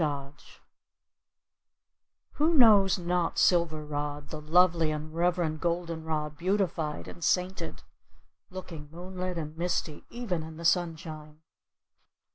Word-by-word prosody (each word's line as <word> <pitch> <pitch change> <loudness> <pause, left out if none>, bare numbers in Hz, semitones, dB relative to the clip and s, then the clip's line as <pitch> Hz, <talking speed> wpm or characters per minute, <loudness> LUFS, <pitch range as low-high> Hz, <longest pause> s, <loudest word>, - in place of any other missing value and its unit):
THOMAS 145 -2 -4 1.8
Who 320 +3 +3
knows 210 -8 +7
not 175 -1 -1
Silver 165 -4 +3
rod, 145 0 -4
the 155 - -6
lovely 165 +1 +4
and 155 +1 -4
reverend 170 -2 0
Golden 170 -1 -1
rod 150 -2 -2
beautified 175 -5 -1
and 175 - -9
sainted, 185 +2 -1 0.7
looking 170 -6 -8
moonlit 180 +1 -5
and 155 -1 -5
misty 170 -2 -2
even 225 -9 -3
in 160 0 -9
the 170 - -7
sunshine! 160 -3 -1
165 Hz, 110 wpm, -29 LUFS, 155-180 Hz, 1.8 s, knows